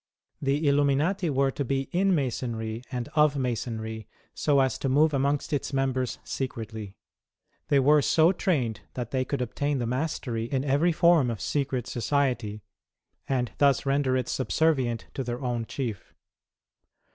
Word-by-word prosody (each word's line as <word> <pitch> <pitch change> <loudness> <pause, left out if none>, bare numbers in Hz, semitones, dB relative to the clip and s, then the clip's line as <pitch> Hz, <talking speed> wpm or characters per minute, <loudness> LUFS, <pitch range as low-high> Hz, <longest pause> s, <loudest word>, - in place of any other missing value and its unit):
The 145 +2 +1
Illuminati 145 +6 +2
were 135 -1 +2
to 140 - -3
be 135 +1 0
in 190 +1 +3
Masonry 115 -5 -2
and 125 -2 -3
of 150 -2 +3
Masonry, 110 -4 -3 0.3
so 145 -2 +2
as 130 -3 +1
to 135 - -1
move 150 +3 +4
amongst 140 +2 0
its 145 0 -2
members 130 -2 0
secretly. 110 -6 -5 0.7
They 140 - +4
were 145 +3 +5
so 160 +4 +4
trained 125 - -1
that 120 -2 -4
they 130 -1 +1
could 130 0 -2
obtain 140 +4 -1
the 120 - -1
mastery 125 -3 -2
in 130 +2 -1
every 145 +5 +3
form 170 -5 +4
of 115 -3 -3
secret 135 -4 -1
society, 120 -4 -1 0.7
and 125 -3 0
thus 140 -1 +3
render 135 -1 +2
it 125 -1 -2
subservient 130 -4 0
to 135 - -3
their 120 0 -4
own 120 -2 -2
Chief. 115 -8 -5
135 Hz, 150 wpm, -27 LUFS, 120-145 Hz, 0.7 s, were